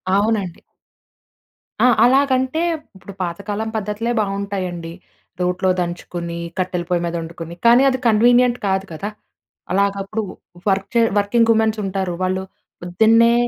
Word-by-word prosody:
అవునండి. 200 -4 0 1.2
ఆ! - - +7 0.2
అలాగంటే, 260 +3 +2 0.3
ఇప్పుడు 190 +1 -11
పాతకాలం 205 +5 -3
పద్ధతులే 215 +3 -2
బావుంటాయి 200 -1 -2
అండి. 170 -1 -7 0.5
రోట్లో 180 +1 +1
దంచుకొని, 175 -1 -4 0.2
కట్టెల 180 -1 -1
పొయ్యి 175 -1 +1
మీద 170 0 -3
వండుకొని, 165 0 -8
కానీ 240 +3 +7
అది 260 -1 -1
కన్వీనియంట్ 240 +2 +4
కాదు 190 0 0
కదా! 195 +6 -4 0.6
అలాగప్పుడు 200 +2 0 0.5
వర్క్‌ 195 0 0
చే 235 - +5 0.2
వర్కింగ్ 230 +3 +2
వుమెన్స్ 220 -1 +2
ఉంటారు. 190 -2 -2
వాళ్ళు 185 +1 -1 0.4
పొద్దున్నే 225 +6 +4
200 Hz, 120 wpm, -20 LUFS, 180-225 Hz, 1.2 s, ఆ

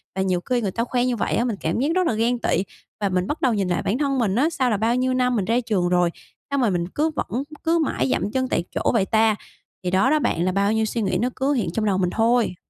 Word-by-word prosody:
Và 190 - 0
nhiều 185 -2 0
khi 250 -1 +2
người 200 -4 -1
ta 230 - -1
khoe 245 0 0
như 250 -1 0
vậy 220 - -1
á 235 - +1
mình 235 -4 -1
cảm 160 +7 -1
giác 270 - +1
rất 370 -2 +2
là - - +1
ghen 235 +3 +1
tị 195 - +1 0.4
và 200 - +1
mình 180 0 0
bắt 300 - -3
đầu 255 -4 +3
nhìn 200 -3 0
lại 175 - 0
bản 210 - 0
thân 275 -2 0
mình 205 -5 +1
á, 280 +7 +3
sao 260 -6 0
là 215 - +1
bao 225 +3 +1
nhiêu 255 +1 +1
năm 250 -1 +1
mình 200 -5 0
ra 230 +4 +2
trường 205 -7 0
rồi, 175 -1 +3 0.4
sao 280 - -1
mà 240 -4 +3
mình 175 -2 -1
cứ 300 - 0
vẫn 260 -1 -2 0.2
cứ 335 +1 +2
mãi 300 -3 0
giậm 205 - 0
chân 260 +1 0
tại 170 - 0
chỗ - - +1
vậy 215 -5 +2
ta? 220 +1 +3 0.5
Thì 180 - -1
đó 190 +6 +3
đó 310 - +3
bạn 170 - 0
là 185 - +1
bao 200 +2 +1
nhiêu 220 0 +1
suy 225 +2 -2
nghĩ 195 -3 0
nó 245 - +1
cứ 275 +2 +1
hiện 210 -11 -1
trong 215 +4 -1
đầu 200 -3 +1
mình 180 -2 +1
thôi. 230 0 +1
225 Hz, 305 wpm, -23 LUFS, 190-255 Hz, 0.5 s, đầu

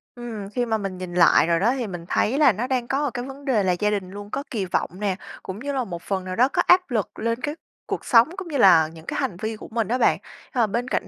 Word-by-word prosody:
Ừm, 225 -5 -7
khi 245 +2 -1
mà 220 -1 0
mình 195 -3 -5
nhìn 180 -1 -6
lại 170 -2 +5
rồi 170 -1 +2
đó 235 +6 +3
thì 240 -4 -2
mình 175 -3 -7
thấy 260 +6 +1
là 295 -5 +6
nó 230 +6 -3
đang 250 -2 -1
có 275 -1 0
cái 245 0 -4
vấn 275 +2 -10
đề 225 -7 +2
là 185 - +2
gia 210 - +2
đình 195 -3 -2
luôn 205 +1 -8
có 280 - -3
kỳ 205 -6 -1
vọng 180 - -1
nè, 200 -3 0 0.3
cũng 190 +3 -6
như 285 +3 -3
là 260 -2 0
một 175 -5 -6
phần 190 -2 -2
nào 185 0 -4
đó 250 +3 +4
có - - +3
áp 365 -3 +4
lực 220 -4 -2
lên 230 +2 -1
cái 300 0 -3 0.3
cuộc - - -4
sống 235 +4 +5
cũng 380 - -6
như 295 -4 -2
là 170 -8 +6
những 160 0 -13
cái - - -3
hành 175 - -2
vi 220 0 -2
của - - -10
mình 225 -3 0
á 245 - 0
bạn. - - +3 0.4
Ờ, 235 -4 +2
bên 235 +5 -2
cạnh - - -1
220 Hz, 295 wpm, -23 LUFS, 190-255 Hz, 0.4 s, là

